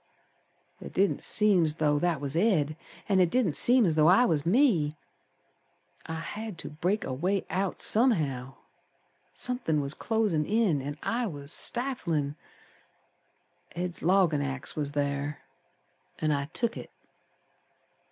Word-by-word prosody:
It - - -9
didn't 195 +1 +1
seem 200 -6 +3
's 150 - +1
though 150 -2 +1
that 170 -2 0
was 140 +1 -3
Ed, 165 -6 +1 0.3
An' 195 -3 +2
it 180 -2 +4
didn't 200 - +1
seem 245 -1 +5
as 165 - +1
though 155 0 +4
I 195 +8 +5
was 155 -5 0
me. 180 - +2 1.1
I 160 - -4
had 205 +4 -6
to - - -8
break 180 +8 -1
a - - -4
way 185 +8 -1
out 190 0 -2
somehow, 150 - +1 0.8
Somethin' 245 - 0
was 140 0 -3
closin' 210 -6 0
in 205 -10 +1
An' 145 +2 -6
I 235 0 -1
was 145 -5 -6
stiflin'. 170 - 0 1.4
Ed's 175 0 -4
loggin' 175 -4 +2
axe 135 -1 -4
was 150 -2 -2
ther, 145 0 -2 0.8
An' 155 - 0
I 140 -1 -1
took 230 +10 -2
it. - - -9
165 Hz, 140 wpm, -28 LUFS, 145-210 Hz, 1.4 s, seem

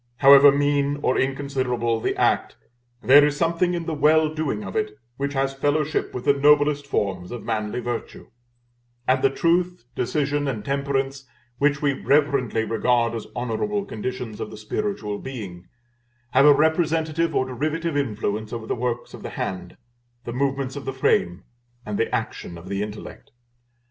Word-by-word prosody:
However 140 +1 +8
mean 145 0 +1
or 130 - +2
inconsiderable 130 -4 -1
the - - -1
act, - - +1 0.5
there 145 +3 +7
is 145 0 +1
something 170 +2 +1
in 170 -1 -4
the 165 - -3
well 155 +1 +3
doing 145 -9 -2
of 95 -2 -7
it, 105 0 -2 0.2
which 140 +1 -2
has 135 0 0
fellowship 145 +2 0
with 125 - -6
the 140 - +5
noblest 145 0 +3
forms 95 -8 -2
of 120 - -6
manly 110 +2 -2
virtue; 120 -1 -6 0.8
and 130 +1 +3
the 135 - +4
truth, 175 +1 0
decision, 145 +3 -1
and 110 -6 -3
temperance, 135 -1 -2 0.3
which 145 +1 +1
we 145 -1 +3
reverently 135 -4 +1
regard 115 +1 +1
as 115 -2 -5
honorable 160 - -2
conditions 115 - -5
of - - -4
the 110 - -10
spiritual 110 - -3
being, 95 -9 -8 0.6
have 135 +3 +5
a - - +9
representative 160 +1 +1
or 130 - +2
derivative 155 +5 -2
influence 110 -5 -2
over 115 -2 -5
the - - -2
works 120 0 -3
of - - -9
the - - -6
hand, 95 - -5 0.5
the 120 - -6
movements 135 0 -1
of 140 - -7
the 135 - -3
frame, 90 -8 +1 0.4
and 105 -1 -3
the - - +1
action 85 - -5
of 85 +3 -11
the 100 0 -2
intellect. 105 0 -8
135 Hz, 165 wpm, -23 LUFS, 115-145 Hz, 0.8 s, a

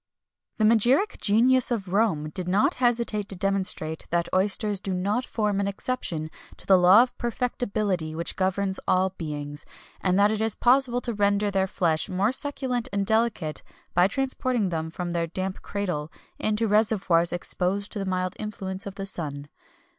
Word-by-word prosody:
The 220 - 0
magiric 240 - +3
genius 245 +5 +4
of 200 -7 -3
Rome 165 -8 +1
did 180 +2 -3
not 210 - +2
hesitate 235 -4 +1
to 195 - -1
demonstrate 185 -4 -1
that 170 0 0
oysters 200 +1 +1
do 190 -1 -3
not 205 +7 0
form 210 -3 -1
an 200 - 0
exception 190 -7 -3 0.3
to - - -11
the 195 - +6
law 185 +6 +7
of 250 - -6
perfectibility 215 -9 -2
which 170 +1 -2
governs 190 0 0
all 185 +1 +2
beings, 150 -4 -6 0.4
and 185 -1 +1
that 205 +1 +4
it 220 0 -2
is 220 -1 0
possible 250 0 +3
to 240 - -1
render 205 0 +1
their 190 -1 +1
flesh 165 -4 0
more 195 +5 +1
succulent 265 -3 -2
and 200 -1 0
delicate 220 -7 0 0.3
by 180 +1 +4
transporting 255 -2 -1
them 160 -1 -3
from 175 +1 -5
their 170 -1 -1
damp 185 +3 -4
cradle 180 -7 -3 0.3
into 215 +1 0
reservoirs 200 -5 +2
exposed 185 +3 -1
to 210 - -4
the 195 - -3
mild 185 -1 -2
influence 195 -3 -5
of 195 - -7
the 195 - -5
sun. 145 -6 -4
195 Hz, 170 wpm, -25 LUFS, 180-220 Hz, 0.4 s, law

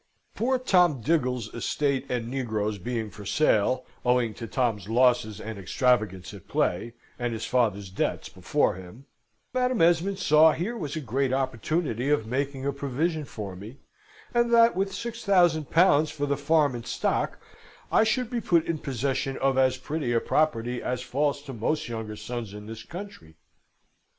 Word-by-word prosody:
"Poor 260 +3 +1
Tom 180 - +3
Diggle's 125 -5 0
estate 140 +2 -1
and 120 -2 -2
negroes 110 -5 -2
being 110 +1 -3
for 105 +2 -10
sale, 110 +2 +2 0.2
owing 125 -3 +2
to 115 - -7
Tom's 110 -7 -1
losses 120 -3 +2
and 110 -2 -6
extravagance 100 -3 0
at 100 -4 -12
play, 115 +7 -1 0.2
and 120 -1 -1
his 110 - -4
father's 105 -6 0
debts - - -2
before - - 0
him 95 +8 -12 0.5
Madam 250 -2 +1
Esmond 175 +4 +3
saw 155 -4 +5
here 200 +9 -3
was 150 -11 -4
a 155 - -3
great 135 +1 -1
opportunity 130 0 -1
of 145 -7 +2
making 135 +3 -2
a 140 - 0
provision 145 +4 -2
for 100 -7 -7
me, 105 +8 -10 0.6
and 235 0 +2
that 230 0 +6
with 195 +1 0
six 230 +2 -5
thousand 175 -7 +3
pounds 160 -3 +4
for 145 -1 -3
the 140 0 0
farm 145 0 +2
and 120 -1 -7
stock, - - -1 0.5
I - - +5
should 245 +2 0
be 240 -1 -1
put 170 -5 +2
in 165 -2 -2
possession 135 +1 -2
of 135 0 +1
as 130 -1 +3
pretty 140 -1 -2
a 115 - +3
property 120 -4 0
as 125 0 -3
falls 140 +2 -1
to 135 -2 -8
most 150 +7 -1
younger 110 -2 -5
sons 115 -2 -6
in 105 0 -9
this 110 +1 -8
country. 170 - -10
130 Hz, 170 wpm, -26 LUFS, 115-160 Hz, 0.6 s, that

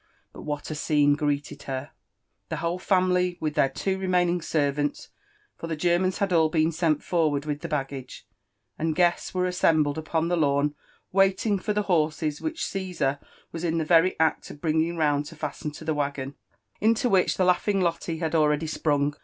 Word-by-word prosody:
Qu^ - - -10
what 145 0 -4
a - - -1
scene 145 -1 +2
gipoeted 145 -1 -2
j^.er 135 +1 -5
I - - -42 0.2
— - - -51
The - - -2
whole 170 +2 -2
family, 180 -1 +2
with 155 -1 -2
their 135 - +3
two 190 +8 -2
remainiAg 180 -2 +1
servants 145 -2 -1 0.5
(for 165 - -7
(be 165 - -2
Germans 175 +3 +1
had 195 -2 0
all 160 -2 +4
be^nsenl 160 -1 +1
forward 155 -5 +1
with 145 -1 -3
(he - - -4
baggage), 135 -3 -5 0.5
and 160 0 0
gue^were 180 +1 +1
assembled 160 -4 +2
upoj) 160 +1 0
the 175 - +2
lawn, 145 -1 +2 0.4
wailing 195 +2 +2
for 210 +3 -2
the 210 0 0
tuMTses 155 -4 0
which 320 +1 -3
C^eiisar 180 -8 -2 0.3
was 165 0 -6
in 165 -1 0
the 160 - 0
very 170 +2 +4
act 160 -1 +1
of 145 - -10
bringing 160 +2 0
rotund 150 -1 +1
lo - - -16
fasten 155 - -4
lo 150 +2 -11
the 160 - 0
waggoo 140 -2 -3 0.5
iulQ 230 +3 +2
which 190 -2 +3
tha 185 - +3
laughing 195 +2 +2
LoUe 170 -1 -1
had 160 -1 -1
already 150 -1 +2
sprur\g. 145 -2 0
160 Hz, 185 wpm, -26 LUFS, 150-180 Hz, 0.5 s, all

